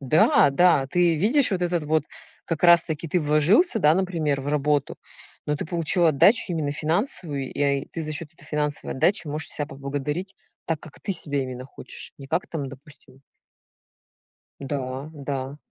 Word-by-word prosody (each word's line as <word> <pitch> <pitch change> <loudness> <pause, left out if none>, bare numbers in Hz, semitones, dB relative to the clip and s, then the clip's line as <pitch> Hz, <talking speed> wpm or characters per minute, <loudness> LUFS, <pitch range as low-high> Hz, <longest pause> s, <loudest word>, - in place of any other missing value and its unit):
Да-да 145 +2 +4
ты 175 -1 +3
видишь 245 - +3
вот 180 -2 -1
этот 175 -3 0
вот 155 0 +1 0.4
как 165 0 -3
раз 170 -1 +7
таки 160 0 -4
ты 180 +3 +1
вложился, 155 - +3
да, 155 -5 +5
например, 165 -7 0
в 140 - -5
работу, 145 -1 0 0.5
но 150 0 0
ты - - -4
получил 170 +1 +1
отдачу 160 - +5
именно 155 -4 -1
финансовую 155 - -2
я 140 -1 +2
и - - -10
ты 165 - -6
за 155 0 -4
счёт 150 +1 -4
этой - - -18
финансовой 150 -1 -2
отдачи 180 +4 +2
можешь 150 +1 -4
себя 150 - -3
поблагодарить 145 +7 -4 0.3
так, 165 -2 -1
как 155 - -14
ты 195 - -2
себя 145 -5 +1
именно 130 -1 -6
хочешь, 135 - -10
не 135 - -10
как 165 +6 -1
там 145 -5 -4
допустим 135 -1 -15 1.4
Да-да. 135 0 -5
150 Hz, 165 wpm, -24 LUFS, 140-170 Hz, 1.4 s, раз